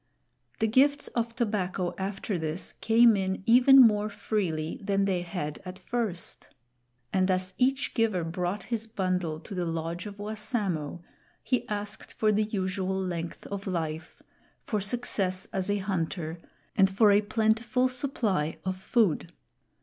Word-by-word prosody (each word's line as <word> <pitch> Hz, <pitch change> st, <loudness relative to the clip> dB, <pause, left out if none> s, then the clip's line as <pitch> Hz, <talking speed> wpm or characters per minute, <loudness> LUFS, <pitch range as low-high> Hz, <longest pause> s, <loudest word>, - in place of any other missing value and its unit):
The 220 Hz, -, +1 dB
gifts 280 Hz, +6 st, +3 dB
of 235 Hz, -1 st, -2 dB
tobacco 195 Hz, -6 st, -1 dB
after 195 Hz, 0 st, -3 dB
this 160 Hz, +3 st, -4 dB
came 230 Hz, 0 st, +6 dB
in 190 Hz, -1 st, -2 dB
even 255 Hz, +3 st, +7 dB
more 210 Hz, -4 st, +6 dB
freely 190 Hz, -7 st, -2 dB
than 195 Hz, 0 st, +1 dB
they 185 Hz, -3 st, 0 dB
had 170 Hz, -4 st, -5 dB
at 185 Hz, 0 st, -7 dB
first; 220 Hz, -8 st, -3 dB, 0.7 s
and 185 Hz, 0 st, +2 dB
as 185 Hz, 0 st, 0 dB
each 265 Hz, +1 st, +1 dB
giver 215 Hz, -7 st, +1 dB
brought 180 Hz, +4 st, -2 dB
his 225 Hz, +1 st, -3 dB
bundle 185 Hz, -6 st, -1 dB
to 200 Hz, -, -9 dB
the 180 Hz, -2 st, -1 dB
lodge 165 Hz, +3 st, -3 dB
of 205 Hz, -1 st, -9 dB
Wassamo, 205 Hz, -, -2 dB, 0.4 s
he 250 Hz, -2 st, -1 dB
asked 210 Hz, 0 st, -4 dB
for 215 Hz, -1 st, +2 dB
the 215 Hz, +1 st, +2 dB
usual 190 Hz, -2 st, -2 dB
length 170 Hz, -3 st, -4 dB
of 200 Hz, 0 st, -5 dB
life, 160 Hz, -3 st, -4 dB, 0.4 s
for 210 Hz, -2 st, -1 dB
success 195 Hz, -3 st, -1 dB
as 190 Hz, 0 st, -1 dB
a 205 Hz, -, +2 dB
hunter, 175 Hz, -4 st, -3 dB, 0.4 s
and 195 Hz, -3 st, +5 dB
for 205 Hz, +2 st, +5 dB
a 200 Hz, +1 st, +5 dB
plentiful 220 Hz, +4 st, +1 dB
supply 235 Hz, -, 0 dB
of 185 Hz, 0 st, -1 dB
food. 190 Hz, -3 st, +1 dB
195 Hz, 145 wpm, -28 LUFS, 180-220 Hz, 0.7 s, even